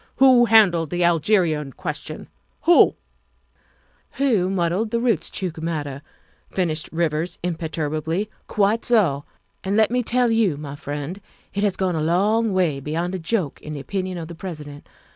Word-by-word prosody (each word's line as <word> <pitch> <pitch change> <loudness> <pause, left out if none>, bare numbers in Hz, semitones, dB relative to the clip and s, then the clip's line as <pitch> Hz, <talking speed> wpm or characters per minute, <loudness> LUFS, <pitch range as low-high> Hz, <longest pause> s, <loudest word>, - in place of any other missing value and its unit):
Who 255 -2 +6
handled 185 -9 +5
the 175 +2 0
Algerian 165 -4 +2
question? 155 -3 -6 0.4
Who 345 - +6 0.5
" - - -39
Who 225 -10 +1
muddled 190 +3 0
the 235 - 0
Roostchook 190 -7 -1
matter?" 145 -4 -3 0.5
finished 165 -4 -2
Rivers 165 +1 -1
imperturbably. 160 +2 -2
" - - -40
Quite 210 +3 +3
so. 175 - +2 0.4
And 195 +2 0
let 220 0 +4
me 250 0 +2
tell 245 0 +1
you, 215 -9 +2
my 145 -1 -7
friend, 145 +6 -6 0.3
it 200 - -1
has 205 -2 +1
gone 185 -2 0
a 155 - -1
long 205 +7 +2
way 175 -7 +1
beyond 165 +6 -3
a 190 - -3
joke 170 -3 -2
in 155 - -7
the 145 - -5
opinion 185 +4 -3
of 165 -2 -6
the 170 - -8
President. 150 -5 -8
175 Hz, 160 wpm, -22 LUFS, 155-205 Hz, 0.5 s, Who